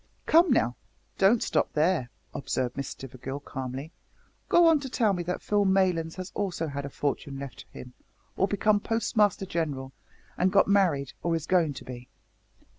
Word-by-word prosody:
"Come, 335 Hz, +2 st, +5 dB
now, 125 Hz, -, +2 dB, 0.4 s
don't 205 Hz, +4 st, +4 dB
stop -, -, 0 dB
there," 155 Hz, -5 st, +1 dB, 0.2 s
observed 130 Hz, -3 st, -2 dB
Miss 140 Hz, -, -3 dB
Stivergill 135 Hz, +2 st, -7 dB
calmly, 135 Hz, +3 st, -6 dB, 0.6 s
"go 345 Hz, -, +6 dB
on 325 Hz, -2 st, +5 dB
to 275 Hz, -2 st, -6 dB
tell 225 Hz, -5 st, +2 dB
me 180 Hz, -, -2 dB
that 180 Hz, +1 st, -4 dB
Phil 205 Hz, -1 st, +2 dB
Maylands 185 Hz, -4 st, +1 dB
has 185 Hz, 0 st, -7 dB
also 185 Hz, -5 st, -2 dB
had 140 Hz, -2 st, -4 dB
a -, -, -7 dB
fortune 140 Hz, 0 st, -3 dB
left 140 Hz, -1 st, -8 dB
him, 125 Hz, 0 st, -10 dB, 0.4 s
or 195 Hz, -, +2 dB
become 205 Hz, +1 st, +2 dB
Postmaster 210 Hz, -3 st, +1 dB
General 145 Hz, -7 st, -3 dB, 0.5 s
and 185 Hz, +1 st, +3 dB
got 200 Hz, 0 st, +4 dB
married, 175 Hz, -9 st, +2 dB
or 170 Hz, -1 st, 0 dB
is 160 Hz, -2 st, -3 dB
going 170 Hz, -5 st, +2 dB
to -, -, -9 dB
be." 125 Hz, 0 st, -9 dB
170 Hz, 170 wpm, -27 LUFS, 140-200 Hz, 0.6 s, go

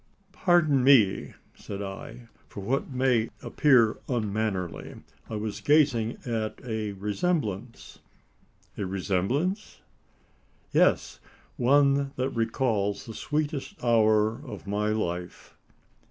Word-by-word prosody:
"Pardon 155 Hz, -9 st, +3 dB
me!" 120 Hz, -8 st, +4 dB, 0.2 s
said 100 Hz, 0 st, -7 dB
I, 100 Hz, +4 st, -8 dB, 0.2 s
"for 100 Hz, -, -8 dB
what 130 Hz, +8 st, -1 dB
may 125 Hz, -4 st, +1 dB
appear 125 Hz, -7 st, +3 dB
unmannerly. 105 Hz, -6 st, -2 dB, 0.3 s
I 110 Hz, -, -4 dB
was 105 Hz, -1 st, -4 dB
gazing 140 Hz, -7 st, +3 dB
at 110 Hz, -3 st, -3 dB
a 110 Hz, -3 st, -3 dB
resemblance." 110 Hz, -, -3 dB, 0.8 s
"A 100 Hz, -, -2 dB
resemblance?" 100 Hz, -, -1 dB, 0.9 s
"Yes! -, -, +2 dB, 0.4 s
one 140 Hz, +2 st, +3 dB
that 130 Hz, +1 st, -1 dB
recalls 115 Hz, -4 st, -1 dB
the 115 Hz, -, -8 dB
sweetest 150 Hz, +2 st, -3 dB
hour 110 Hz, 0 st, +3 dB
of 135 Hz, -, -9 dB
my 105 Hz, +1 st, -1 dB
life." 90 Hz, -5 st, -4 dB
115 Hz, 100 wpm, -27 LUFS, 105-135 Hz, 0.9 s, me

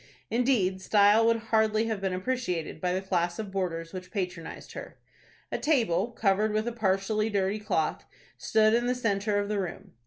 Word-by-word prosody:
Indeed, 230 Hz, -7 st, +1 dB
style 210 Hz, +3 st, +5 dB
would 230 Hz, 0 st, +4 dB, 0.2 s
hardly 220 Hz, 0 st, +3 dB
have 220 Hz, -3 st, -2 dB
been 190 Hz, -1 st, -1 dB
appreciated 185 Hz, -6 st, -3 dB
by 180 Hz, -, 0 dB
the 185 Hz, +1 st, -1 dB
class 175 Hz, -2 st, 0 dB
of 215 Hz, -3 st, -5 dB
boarders 165 Hz, -3 st, -3 dB
which 185 Hz, -1 st, -7 dB
patronized 180 Hz, -5 st, -5 dB
her. -, -, -9 dB, 0.5 s
A -, -, -2 dB
table, 230 Hz, -, +2 dB
covered 210 Hz, -2 st, +1 dB
with 215 Hz, +2 st, 0 dB
a -, -, 0 dB
partially 215 Hz, 0 st, 0 dB
dirty 200 Hz, 0 st, 0 dB
cloth, 210 Hz, -, -1 dB, 0.3 s
stood 215 Hz, 0 st, +3 dB
in 240 Hz, +1 st, +2 dB
the 250 Hz, -, +1 dB
centre 210 Hz, -3 st, 0 dB
of 205 Hz, 0 st, 0 dB
the 210 Hz, -1 st, -1 dB
room. 185 Hz, -3 st, -5 dB
205 Hz, 180 wpm, -28 LUFS, 185-220 Hz, 0.5 s, style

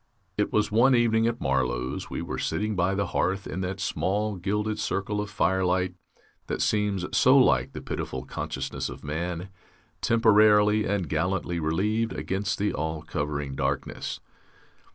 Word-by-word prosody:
It 105 Hz, -, 0 dB
was 105 Hz, 0 st, +1 dB
one 125 Hz, +5 st, +5 dB
evening 115 Hz, -1 st, +3 dB
at 120 Hz, 0 st, -1 dB
Marlow's, 65 Hz, -1 st, -1 dB
we -, -, -4 dB
were -, -, -4 dB
sitting 105 Hz, 0 st, -1 dB
by 95 Hz, +2 st, +1 dB
the 100 Hz, 0 st, 0 dB
hearth 95 Hz, +3 st, -1 dB
in 95 Hz, -, -4 dB
that 95 Hz, +1 st, -3 dB
small 100 Hz, +2 st, -1 dB
gilded 105 Hz, +4 st, -2 dB
circle 105 Hz, +1 st, -1 dB
of 105 Hz, -, -5 dB
firelight 90 Hz, -1 st, +1 dB, 0.5 s
that -, -, -2 dB
seems 105 Hz, -3 st, +1 dB
so 130 Hz, +2 st, +6 dB
like 70 Hz, -, +3 dB
the -, -, -6 dB
pitiful -, -, -4 dB
consciousness 65 Hz, +1 st, -4 dB
of -, -, -9 dB
man, 85 Hz, +4 st, -3 dB, 0.5 s
temporarily 105 Hz, -2 st, +5 dB
and 95 Hz, -4 st, -1 dB
gallantly 85 Hz, +2 st, -1 dB
relieved 105 Hz, +9 st, 0 dB
against 100 Hz, +2 st, -2 dB
the 105 Hz, 0 st, 0 dB
all 80 Hz, 0 st, -3 dB
covering 75 Hz, -2 st, -3 dB
darkness. -, -, -2 dB
95 Hz, 150 wpm, -27 LUFS, 85-105 Hz, 0.5 s, so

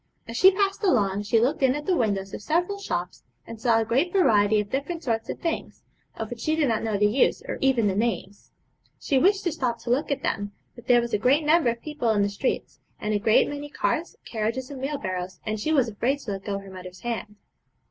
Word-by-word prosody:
As 230 Hz, -, -7 dB
she 370 Hz, +10 st, +8 dB
passed 390 Hz, +1 st, 0 dB
along 205 Hz, -, +2 dB
she 210 Hz, +2 st, +2 dB
looked 260 Hz, +7 st, +1 dB
in 260 Hz, 0 st, +4 dB
at 295 Hz, 0 st, -5 dB
the 370 Hz, -, +2 dB
windows 200 Hz, -, -1 dB
of -, -, -6 dB
several 350 Hz, -, 0 dB
shops, 180 Hz, -, -4 dB, 0.2 s
and 225 Hz, -1 st, -9 dB
saw 230 Hz, -2 st, +3 dB
a 225 Hz, -, 0 dB
great 265 Hz, +11 st, +1 dB
variety 215 Hz, -, +4 dB
of 205 Hz, -1 st, -4 dB
different 305 Hz, +5 st, -3 dB
sorts 225 Hz, -3 st, -1 dB
of -, -, -4 dB
things, 335 Hz, -1 st, -4 dB, 0.3 s
of -, -, -5 dB
which -, -, -6 dB
she 310 Hz, 0 st, 0 dB
did 310 Hz, -3 st, +2 dB
not 225 Hz, -, +1 dB
know 220 Hz, -2 st, -1 dB
the 210 Hz, -, +3 dB
use 215 Hz, +6 st, +2 dB
or -, -, -4 dB
even 265 Hz, -4 st, +3 dB
the 200 Hz, -, +2 dB
names. 205 Hz, -2 st, -2 dB, 0.5 s
She 275 Hz, -, +1 dB
wished 390 Hz, +6 st, +3 dB
to 345 Hz, -, 0 dB
stop 250 Hz, -6 st, -1 dB
to 240 Hz, -, -3 dB
look 275 Hz, +5 st, +1 dB
at 280 Hz, -2 st, -2 dB
them, 205 Hz, 0 st, -2 dB, 0.2 s
but 240 Hz, -, -15 dB
there 240 Hz, -1 st, +5 dB
was 235 Hz, 0 st, -5 dB
a 210 Hz, -, +2 dB
great 275 Hz, +7 st, +3 dB
number 310 Hz, -4 st, +4 dB
of 235 Hz, 0 st, -4 dB
people 300 Hz, -6 st, -2 dB
in 210 Hz, -2 st, +3 dB
the 200 Hz, -, +1 dB
streets, 200 Hz, +6 st, -3 dB, 0.2 s
and 215 Hz, -, -2 dB
a 205 Hz, -, +1 dB
great 215 Hz, +2 st, +4 dB
many 290 Hz, 0 st, -6 dB
carts, 320 Hz, +3 st, -1 dB
carriages, 230 Hz, +4 st, -3 dB
and 270 Hz, -2 st, -7 dB
wheelbarrows, 185 Hz, -11 st, -4 dB
and 215 Hz, -1 st, -2 dB
she 310 Hz, -, -1 dB
was 270 Hz, -6 st, +3 dB
afraid 235 Hz, +6 st, 0 dB
to 225 Hz, -, -5 dB
let 195 Hz, -1 st, -5 dB
go 200 Hz, -1 st, -2 dB
her 195 Hz, -1 st, -10 dB
mother's 185 Hz, 0 st, -10 dB
hand. 230 Hz, -3 st, -4 dB
235 Hz, 240 wpm, -25 LUFS, 210-290 Hz, 0.5 s, she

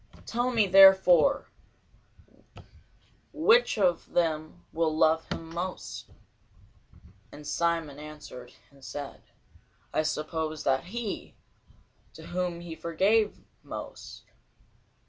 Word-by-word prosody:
Tell 240 Hz, +2 st, -1 dB
me 230 Hz, -4 st, +3 dB
therefore, 195 Hz, +6 st, +6 dB, 1.8 s
which 475 Hz, -, +4 dB
of 180 Hz, -5 st, 0 dB
them 160 Hz, 0 st, -1 dB
will 160 Hz, -1 st, 0 dB
love 160 Hz, 0 st, +2 dB
him 165 Hz, 0 st, -6 dB
most? 180 Hz, +2 st, -6 dB, 1.3 s
Simon 165 Hz, -3 st, -1 dB
answered 150 Hz, -5 st, -10 dB, 0.2 s
and 140 Hz, -1 st, -21 dB
said, 140 Hz, +1 st, -7 dB, 0.7 s
I -, -, +2 dB
suppose 155 Hz, 0 st, -3 dB
that 135 Hz, +2 st, +1 dB
he, 220 Hz, +2 st, -5 dB, 0.8 s
to -, -, -11 dB
whom 180 Hz, -1 st, -2 dB
he 170 Hz, -1 st, -7 dB
forgave 200 Hz, +7 st, +1 dB, 0.2 s
most. -, -, -9 dB
170 Hz, 90 wpm, -28 LUFS, 155-190 Hz, 1.8 s, therefore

